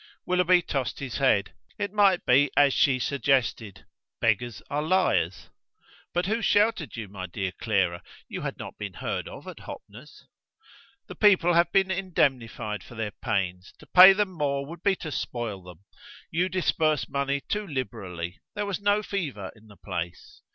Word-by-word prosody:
Willoughby 180 -1 +3
tossed 135 -5 -2
his 135 -4 -5
head: 130 -7 +2 0.2
it 205 -1 -3
might 200 -3 +4
be 140 +3 +5
as 145 -2 +5
she 135 -2 +3
suggested; 130 -6 0 0.3
beggars 115 -1 0
are 145 +1 -1
liars. 155 - +1 0.6
"But 175 +1 0
who 220 +4 0
sheltered 205 - +2
you, 110 -3 -6
my 95 -1 -7
dear 95 +1 -3
Clara? 95 -6 +1 0.3
You - - -6
had - - -4
not - - -9
been 100 -2 -5
heard - - -4
of - - -10
at - - -9
Hoppner's." - - -12 0.8
"The - - -9
people 185 -4 +4
have 170 0 +3
been 190 -1 +3
indemnified 130 - -1
for 120 - -13
their 110 -2 -3
pains. 95 -3 -3
To - - -16
pay 185 +1 +9
them 195 0 +1
more 140 -5 -1
would 165 +3 -10
be 195 0 +2
to 160 -4 -7
spoil 115 -8 -4
them. 90 -1 -13 0.5
You 180 +3 +1
disperse 160 -4 +1
money 140 0 -1
too 210 +8 -3
liberally. 95 - -5 0.2
There 205 0 -2
was 200 -2 -3
no 205 +1 +2
fever 145 - -4
in 110 0 -19
the 105 -2 -16
place. 85 -3 -6
140 Hz, 165 wpm, -26 LUFS, -, 0.8 s, pay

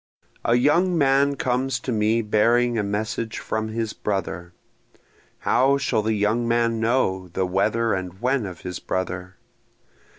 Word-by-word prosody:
A 115 - +3
young 170 +8 +3
man 140 -1 +3
comes 125 0 -1
to 130 - -3
me 110 +1 +1
bearing 120 +3 +2
a 110 - +1
message 110 +2 -3
from 110 0 -3
his 110 0 -3
brother, 90 -3 -3 0.9
How 135 +2 +3
shall 140 -5 0
the 110 +1 0
young 110 +3 +1
man 115 -1 +1
know 110 -6 +1
the 95 +2 -2
whether 110 +5 +1
and 95 -1 -4
when 125 -2 0
of 90 -3 -9
his 90 -2 -5
brother? 95 0 -4
110 Hz, 145 wpm, -23 LUFS, 100-125 Hz, 0.9 s, A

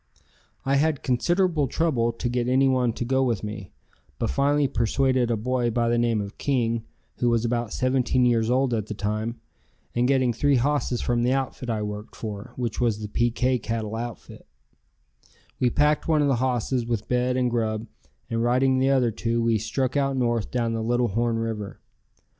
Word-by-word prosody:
I 135 +1 +2
had 150 0 +1
considerable 160 +4 +1
trouble 125 -6 +1
to 115 +1 -4
get 120 0 -1
anyone 130 -1 +3
to 120 - -4
go 130 +2 +1
with 115 -6 -1
me, 105 -3 -6 0.5
but - - -1
finally 145 - +2
persuaded 130 +1 +1
a 115 - +1
boy 125 +2 0
by 115 0 +1
the 120 0 +2
name 115 -2 +1
of 100 0 -8
King, 115 -4 0 0.3
who 120 - +1
was 115 0 +1
about 120 -1 -1
17 130 -1 +1
years 115 -2 +2
old 130 0 +2
at 110 -2 -1
the 105 - -5
time, 110 +3 -3 0.5
and 120 +1 +2
getting 130 -3 +2
three 145 +4 +2
hosses 130 -1 0
from 120 -1 0
the 125 +2 +2
outfit 130 -2 -3
I 110 -2 -1
worked 105 0 -6
for, 105 +1 -6
which 120 -2 -3
was 115 -4 +2
the 105 -1 -6
PK 120 +2 +1
cattle 110 -2 -3
outfit, 115 -3 -7 1.1
we 125 - +3
packed 150 +4 +2
one 155 -2 +3
of - - +2
the 135 -3 +2
hosses 125 0 0
with 115 -2 -3
bed 125 +1 +1
and 125 -1 +1
grub, 110 -2 -1 0.4
and 115 0 -1
riding 130 +2 +2
the 135 +1 +2
other 130 -4 +3
two 115 +2 -1
we 115 -1 +2
struck 130 +5 -2
out 135 -1 +1
north 120 -3 0
down 115 -2 -1
the 115 - -2
Little 120 +1 +1
Horn 115 +3 0
River. 110 -3 -4
120 Hz, 190 wpm, -25 LUFS, 115-130 Hz, 1.1 s, anyone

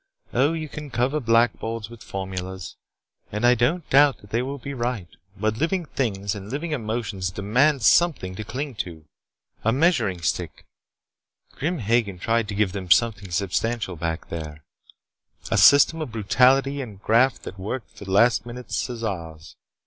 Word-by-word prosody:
"Oh, 140 +6 +3
you 160 -1 -4
can 150 0 -8
cover 130 +4 0
blackboards 115 -2 +1
with 115 0 -13
formulas, 95 -1 -6 0.6
and 105 +3 -1
I 120 - +7
don't 140 +8 0
doubt 140 0 +6
that 105 - -18
they 115 - +1
will 135 +3 -4
be 140 +2 -7
right. 120 -7 -3 0.3
But 110 +1 -1
living 170 +3 0
things 100 -9 -2
and 100 -1 -8
living 155 +5 -3
emotions 110 -7 -2
demand 125 +9 +2
something 150 - +3
to 110 - -6
cling 135 +6 -5
to. 80 -5 -6 0.6
A 115 - +3
measuring 130 - +2
stick. - - -2 0.9
Grim 170 +5 -2
Hagen 110 -5 0
tried 115 +4 0
to 105 - -5
give 100 -2 +1
them 95 -2 -6
something 100 0 +3
substantial 100 +3 -1
back 80 0 -4
there: 75 -2 -7 0.9
A - - +2
system 145 +3 +6
of 150 - -4
brutality 130 +6 +3
and 105 -7 -8
graft 115 +5 +2
that 95 - -8
worked 110 +6 -5
for 100 - -10
the 95 - -6
last 110 +1 +4
minute 120 +1 -9
Caesars. 90 -10 -4
115 Hz, 160 wpm, -24 LUFS, 95-135 Hz, 0.9 s, I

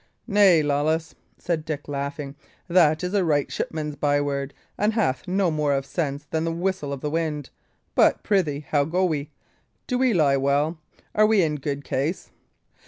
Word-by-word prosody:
"Nay, 200 -7 +5
Lawless," 155 +3 0 0.2
said 165 -3 -2
Dick, 155 -2 -5
laughing, 140 0 -4 0.3
"that 170 -2 +4
is 180 +2 -2
a 200 -2 +3
right 145 -4 +1
shipman's 150 -2 -3
byword, 145 -1 0 0.2
and 210 +2 +1
hath 195 - 0
no 185 -1 +1
more 150 -2 +1
of 135 -1 -1
sense 145 -2 -3
than 160 0 0
the 165 - -1
whistle 175 -3 -2
of 140 -2 -5
the 150 - -2
wind. 155 -3 -2 0.4
But, - - +3
prithee, 165 -8 +1
how 145 -2 +2
go 180 +5 +1
we? 150 -4 -2 0.6
Do 250 -1 -1
we 255 -5 +3
lie 140 -5 +4
well? 145 +4 +1 0.3
Are 215 0 +5
we 215 -4 +4
in 150 -2 0
good 140 0 -4
case?" 145 +8 -2
155 Hz, 170 wpm, -24 LUFS, 145-180 Hz, 0.6 s, Nay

